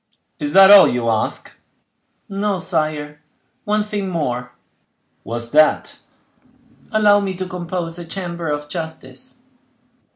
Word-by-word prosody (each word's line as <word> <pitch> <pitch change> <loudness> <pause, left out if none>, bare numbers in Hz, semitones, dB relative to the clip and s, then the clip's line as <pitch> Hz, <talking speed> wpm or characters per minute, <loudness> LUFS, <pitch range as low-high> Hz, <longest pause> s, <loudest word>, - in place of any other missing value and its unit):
"Is 295 0 -3
that 195 0 +8
all 205 -1 +9
you 120 -1 -1
ask?" 110 -1 -2 0.7
"No, 200 0 -1
sire, 155 -4 -2 0.4
one 210 0 +1
thing 205 -2 -4
more." 125 -8 -3 0.7
"What 115 - -6
is 120 0 -4
that?" 155 +1 +3 0.9
"Allow 210 -2 +4
me 195 -2 -3
to 185 +1 -4
compose 175 -2 -5
a 175 - -7
chamber 170 -2 -4
of 150 0 -3
justice." 165 - -6
175 Hz, 125 wpm, -19 LUFS, 150-195 Hz, 0.9 s, all